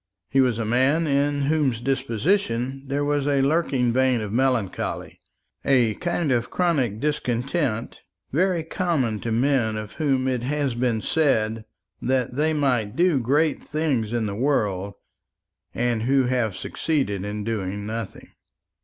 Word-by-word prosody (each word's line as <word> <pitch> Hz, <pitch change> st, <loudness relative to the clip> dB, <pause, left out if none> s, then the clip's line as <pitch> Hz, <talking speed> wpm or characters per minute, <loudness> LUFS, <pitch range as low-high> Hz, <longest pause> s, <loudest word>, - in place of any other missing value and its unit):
He 135 Hz, 0 st, +4 dB
was 125 Hz, -4 st, +2 dB
a 115 Hz, -, -2 dB
man 130 Hz, +8 st, +2 dB
in 145 Hz, 0 st, +1 dB
whose 140 Hz, -5 st, +1 dB
disposition 135 Hz, -, -1 dB
there 140 Hz, +2 st, -1 dB
was 145 Hz, -1 st, 0 dB
a 140 Hz, -2 st, +2 dB
lurking 135 Hz, -5 st, +1 dB
vein 130 Hz, -1 st, +3 dB
of 105 Hz, -1 st, -5 dB
melancholy 125 Hz, -6 st, -1 dB, 0.4 s
a 125 Hz, -5 st, +3 dB
kind 170 Hz, -, -1 dB
of 120 Hz, -2 st, 0 dB
chronic 140 Hz, -, 0 dB
discontent 125 Hz, -2 st, -1 dB, 0.3 s
very 175 Hz, +2 st, +1 dB
common 155 Hz, -, -1 dB
to 115 Hz, -, -4 dB
men 120 Hz, -2 st, +1 dB
of 110 Hz, -1 st, -6 dB
whom 135 Hz, -3 st, +1 dB
it 125 Hz, -2 st, 0 dB
has 140 Hz, 0 st, -1 dB
been 120 Hz, -2 st, 0 dB
said 110 Hz, -8 st, +1 dB, 0.4 s
that 130 Hz, -2 st, 0 dB
they 150 Hz, +4 st, +1 dB
might 125 Hz, -9 st, 0 dB
do 170 Hz, -4 st, +3 dB
great 145 Hz, +5 st, +1 dB
things 145 Hz, -8 st, -1 dB
in 120 Hz, -2 st, 0 dB
the 100 Hz, -, -3 dB
world, 100 Hz, -6 st, 0 dB, 0.8 s
and 120 Hz, -2 st, 0 dB
who 135 Hz, +3 st, +3 dB
have 125 Hz, -5 st, 0 dB
succeeded 135 Hz, -, -1 dB
in 105 Hz, +1 st, -4 dB
doing 100 Hz, -2 st, -3 dB
nothing. 110 Hz, -1 st, -6 dB
130 Hz, 145 wpm, -24 LUFS, 115-145 Hz, 0.8 s, He